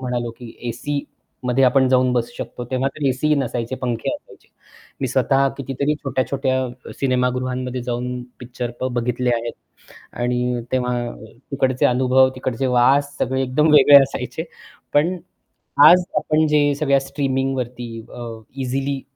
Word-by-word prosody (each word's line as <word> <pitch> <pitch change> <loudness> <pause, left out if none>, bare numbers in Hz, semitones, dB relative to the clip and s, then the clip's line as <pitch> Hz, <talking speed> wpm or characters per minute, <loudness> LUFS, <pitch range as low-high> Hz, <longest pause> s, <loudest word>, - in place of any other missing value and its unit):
म्हणालो 120 -2 -2
की 120 -2 -10 0.2
एसीमध्ये 130 0 -2
आपण 130 +1 +4
जाऊन 130 -1 +3
बसू 120 -1 -1
शकतो, 125 - -6
तेव्हा 130 +1 0
तर 145 -2 -1
एसीही 150 +4 +1
नसायचे 125 -2 -2
पंखे 120 -3 -2
असायचे. - - -14 0.5
मी - - 0
स्वतः 135 0 +2
कितीतरी 140 +2 -1
छोट्या-छोट्या 130 -2 -2
सिनेमागृहांमध्ये 125 -1 -1
जाऊन 125 +1 -3 0.2
पिक्चर 120 0 -5 0.2
बघितले 125 +1 -1
आहेत. 115 0 -3 0.6
आणि 125 0 -1
तेव्हा 125 -1 0 0.6
तिकडचे 130 -2 +2
अनुभव, 130 +1 +4
तिकडचे 130 0 -2
वास 135 +3 +3
सगळे 130 +1 0
एकदम 135 +5 +2
वेगळे 145 -1 +8
असायचे. 130 +2 -4 0.5
पण 165 +6 +3 0.7
आज 180 0 +7
आपण 155 0 +2
जे 145 -1 +3
सगळ्या 140 -2 +2
स्ट्रीमिंगवरती 135 -3 -2 0.3
अ, 120 - -7 0.3
इझिली 135 +1 -2
130 Hz, 125 wpm, -21 LUFS, 125-135 Hz, 0.7 s, वेगळे